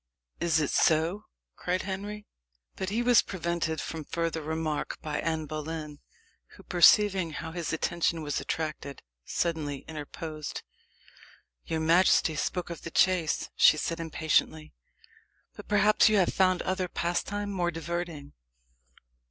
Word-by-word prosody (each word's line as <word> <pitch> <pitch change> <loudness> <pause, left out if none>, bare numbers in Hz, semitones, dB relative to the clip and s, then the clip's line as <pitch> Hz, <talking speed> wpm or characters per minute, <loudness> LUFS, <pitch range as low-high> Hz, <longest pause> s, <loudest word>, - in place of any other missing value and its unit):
is 165 -2 +2
it 150 - 0
so?" 165 +6 +2 0.3
cried 180 +1 -2
Henry. 205 +2 -5 0.5
But 190 -1 -3
he 225 +4 0
was 245 -2 +6
prevented 170 -3 -2
from 160 -1 -5
further 165 +1 -2
remark 155 0 -3
by 150 -1 -2
Anne 160 -1 -1
Boleyn, 155 0 -6 0.6
who, - - -15
perceiving 185 -1 +4
how 165 +1 -5
his 170 -2 -3
attention 165 0 0
was 145 -1 -2
attracted, 155 -3 -4 0.2
suddenly 155 -5 -2
interposed. 155 0 -6 1.0
"Your 160 -1 -1
majesty 165 0 +4
spoke 175 +4 -2
of 170 - -7
the - - -6
chase," 175 -2 +1
she 155 - +6
said 165 +2 -2
impatiently. 160 -1 0 0.8
"But - - -11
perhaps 210 +1 +4
you 215 - +3
have 185 - +2
found 185 -1 +2
other 185 0 -1
pastime 200 +4 -2
more 175 -3 0
diverting?" 165 -3 -5
165 Hz, 130 wpm, -28 LUFS, 155-185 Hz, 1.0 s, was